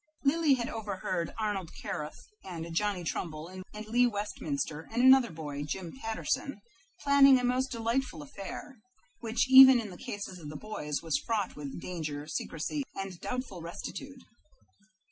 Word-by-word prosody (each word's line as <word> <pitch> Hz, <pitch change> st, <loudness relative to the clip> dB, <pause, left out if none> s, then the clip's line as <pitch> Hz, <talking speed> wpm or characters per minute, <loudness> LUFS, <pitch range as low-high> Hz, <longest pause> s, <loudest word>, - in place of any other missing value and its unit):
Lily 295 Hz, 0 st, +4 dB
had 235 Hz, -2 st, -2 dB
overheard 190 Hz, -5 st, -3 dB
Arnold 205 Hz, -6 st, -2 dB
Carruth 150 Hz, 0 st, -5 dB, 0.2 s
and 170 Hz, -3 st, -6 dB
Johnny 200 Hz, 0 st, 0 dB
Trumbull 160 Hz, -1 st, -4 dB
and 185 Hz, 0 st, -8 dB, 0.2 s
Lee 240 Hz, +3 st, +4 dB
Westminster 160 Hz, -8 st, -3 dB
and 230 Hz, -, -1 dB
another 260 Hz, -2 st, +7 dB
boy, 150 Hz, -3 st, -6 dB
Jim 165 Hz, +4 st, -5 dB
Patterson, 260 Hz, +1 st, -2 dB, 0.4 s
planning 280 Hz, -1 st, +7 dB
a -, -, -3 dB
most 255 Hz, +2 st, +1 dB
delightful 230 Hz, -, -1 dB
affair, 195 Hz, -, -8 dB, 0.4 s
which 230 Hz, 0 st, +1 dB
even 265 Hz, -1 st, +10 dB
in 215 Hz, -4 st, -5 dB
the 180 Hz, -, -10 dB
cases 200 Hz, -3 st, -5 dB
of 150 Hz, -3 st, -8 dB
the 150 Hz, -, -8 dB
boys 150 Hz, -9 st, -4 dB
was 165 Hz, -, 0 dB
fraught 215 Hz, -5 st, -1 dB
with 145 Hz, 0 st, -6 dB
danger, 155 Hz, -5 st, -4 dB
secrecy, 160 Hz, -, -3 dB
and 195 Hz, -3 st, -5 dB
doubtful 250 Hz, -8 st, -4 dB
rectitude. 255 Hz, +10 st, -7 dB
205 Hz, 145 wpm, -30 LUFS, 165-250 Hz, 0.4 s, even